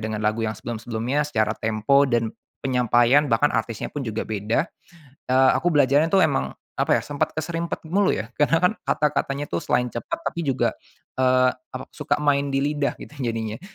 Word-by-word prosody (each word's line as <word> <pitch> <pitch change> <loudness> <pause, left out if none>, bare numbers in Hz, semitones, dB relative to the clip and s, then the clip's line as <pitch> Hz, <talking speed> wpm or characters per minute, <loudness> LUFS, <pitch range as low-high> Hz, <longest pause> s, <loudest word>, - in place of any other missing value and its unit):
dengan 110 -1 -3
lagu 110 +2 +1
yang 110 -1 -2
sebelum-sebelumnya 120 +5 -2
secara 110 -6 +1
tempo 110 +6 +2
dan 115 -3 0 0.3
penyampaian 125 +2 +3
bahkan 130 +5 +2
artisnya 115 -1 -3
pun 145 - -4
juga 110 0 -3
beda. 110 +6 -1 0.6
Eee, 130 +1 +5
aku 175 - +1
belajarnya 145 0 +3
tu 195 - +3
memang, 65 0 -1 0.2
apa - - +3
ya, - - -1
sempat 145 -1 -2
keserimpet 165 +2 -3
mulu 190 +5 +2
ya, 110 +2 -5
karena 150 +2 +3
kan 180 - +4
kata-katanya 145 -1 0
itu 85 - -1
selain 125 0 0
cepat 330 - -4
tapi 170 - -2
juga, 135 -2 +1 0.5
eee, 130 0 +4
apa, 130 +1 -10
suka - - -1
main 140 -1 +1
di 135 0 0
lidah 145 -3 -1
gitu - - -11
jadinya. 115 -3 -3
130 Hz, 175 wpm, -23 LUFS, 110-145 Hz, 0.6 s, Eee